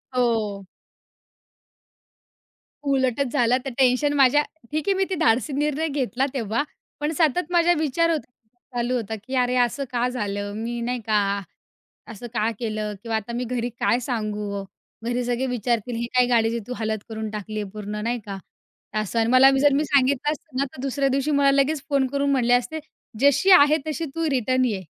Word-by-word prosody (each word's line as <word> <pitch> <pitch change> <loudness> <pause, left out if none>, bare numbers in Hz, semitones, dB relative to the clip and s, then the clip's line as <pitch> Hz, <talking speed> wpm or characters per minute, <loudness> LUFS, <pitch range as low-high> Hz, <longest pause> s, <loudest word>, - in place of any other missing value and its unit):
हो. 220 -5 0 2.3
उलटच 260 0 +1
झालं, 245 +1 +3
तर 270 - -2
टेन्शन 265 +2 +3
माझ्या 280 0 +5 0.3
ठीक 310 +5 -2
आहे 395 - +4
मी 385 - +2
ते 375 - -1
धाडसी 255 - +2
निर्णय 300 +3 0
घेतला 270 -2 -1
तेव्हा. 230 0 -1 0.4
पण 295 +1 -1
सतत 330 +2 +1
माझा 345 0 +4
विचार 315 +2 +1
होता 315 -3 -1 0.5
चालू 240 +1 0
होता, 220 -2 -3
की 260 +2 -5
"अरे! 250 0 +2
असं 275 +4 -4
का 245 0 +1
झालं?" 205 -4 -3
मी 240 +1 -3
नाही 245 +1 -2
का? 215 - +3 0.9
"असं 230 +3 -8
का 220 0 +1
केलं? 215 -2 -3
किंवा 230 -1 -2
आता 220 +2 -3
मी 245 - -2
घरी 245 0 -2
काय 240 - +2
सांगू 210 -4 -2
ओ? - - -7 0.4
घरी 240 +1 -1
सगळे 245 +2 -1
विचारतील, 240 -1 -1
ही 235 - -2
काय 250 - +6
गाडीची 230 -1 +2
तू 250 - -4
हालत 220 -1 -1
करून 220 0 -4
टाकली 215 0 -5
आहे 200 - -6
पूर्ण?" 210 0 -6
नाही 235 +1 -1
का? 195 -2 -5 0.6
असं 215 +2 -2
आणि 225 - +2
मला 260 +1 +7
जर 290 -1 +5
मी 295 +2 +2
सांगितलं 280 +1 +2
असतं 305 -3 -8
ना, 275 - +2
तर 260 - -8
दुसऱ्या 275 0 0
दिवशी 275 +3 0
मला 280 -1 +4
लगेच 275 +1 +2
फोन 275 -2 +2
करून 280 +1 -1
म्हटले 245 -3 +3
असते, 245 +6 0 0.4
"जशी 285 +7 +4
आहे 305 -4 +7
तशी 320 +2 -2
तू 330 -1 0
रिटर्न 255 -1 +1
ये." 215 -6 -1
250 Hz, 185 wpm, -23 LUFS, 230-280 Hz, 2.3 s, मला